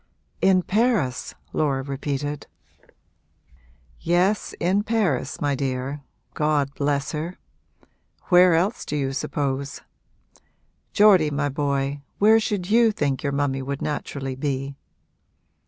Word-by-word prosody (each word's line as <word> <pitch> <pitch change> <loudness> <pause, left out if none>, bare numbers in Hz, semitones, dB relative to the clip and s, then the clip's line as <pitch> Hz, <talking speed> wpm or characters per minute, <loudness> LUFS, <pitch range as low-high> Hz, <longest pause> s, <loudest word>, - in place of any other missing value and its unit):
'In 185 -1 +4
Paris?' 205 - 0 0.2
Laura 140 -3 0
repeated. 140 +1 -4 1.5
'Yes, 180 +5 +1
in 185 +4 +2
Paris, 200 - -1
my 145 -1 0
dear 135 +1 -3 0.3
God 150 -2 0
bless 140 -1 -1
her! 160 +4 -4 0.9
Where 180 -1 +6
else 190 +8 0
do 150 - -4
you 135 -2 -1
suppose? 140 -1 -3 1.1
Geordie 195 -7 +5
my 145 0 -1
boy, 140 0 -1 0.2
where 220 +2 +6
should 205 -4 -2
you 230 0 +5
think 145 -9 -1
your 140 - -1
mummy 140 -1 -1
would 140 +1 -4
naturally 140 -3 -4
be?' 135 0 -3
145 Hz, 110 wpm, -24 LUFS, 140-180 Hz, 1.5 s, Where